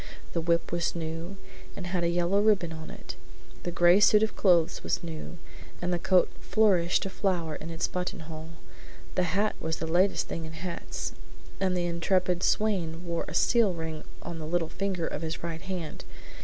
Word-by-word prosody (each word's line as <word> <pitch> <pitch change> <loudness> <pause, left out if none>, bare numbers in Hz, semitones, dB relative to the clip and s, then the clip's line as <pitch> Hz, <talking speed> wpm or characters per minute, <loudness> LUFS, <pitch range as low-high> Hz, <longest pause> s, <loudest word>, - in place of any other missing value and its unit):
The 170 - 0
whip 170 +1 +1
was 170 0 0
new 165 +3 -4 0.4
and 185 - -6
had 175 -1 -1
a 170 - +2
yellow 175 +3 +2
ribbon 195 -6 +3
on 160 0 -8
it; - - -8 0.5
the - - -3
gray 175 +2 +5
suit 210 +1 +6
of 220 - 0
clothes 175 -5 +3
was - - -1
new, 165 +1 -6 0.4
and 180 0 -1
the 175 - 0
coat 185 0 +4
flourished 190 -6 +3
a - - -2
flower 175 -5 0
in 155 +2 -6
its 165 0 -1
button 180 -1 -3
hole. 160 +1 -8 0.6
The - - +2 0.2
hat 210 +1 +2
was 160 0 -2
the 160 - -3
latest 180 +4 +2
thing 165 - -4
in 160 - -8
hats, 170 +2 -4 0.5
and 185 -2 +1
the 175 - 0
intrepid 175 +1 +1
swain 180 -7 +1
wore 170 -1 -2
a - - -6
seal 230 -6 +4
ring 160 -1 -5 0.2
on 170 -1 -5
the 155 - -5
little 165 -1 0
finger 190 -4 -2
of 150 - -3
his 160 0 -4
right 165 -1 -4
hand. 185 -5 -5
175 Hz, 190 wpm, -29 LUFS, 165-185 Hz, 0.6 s, suit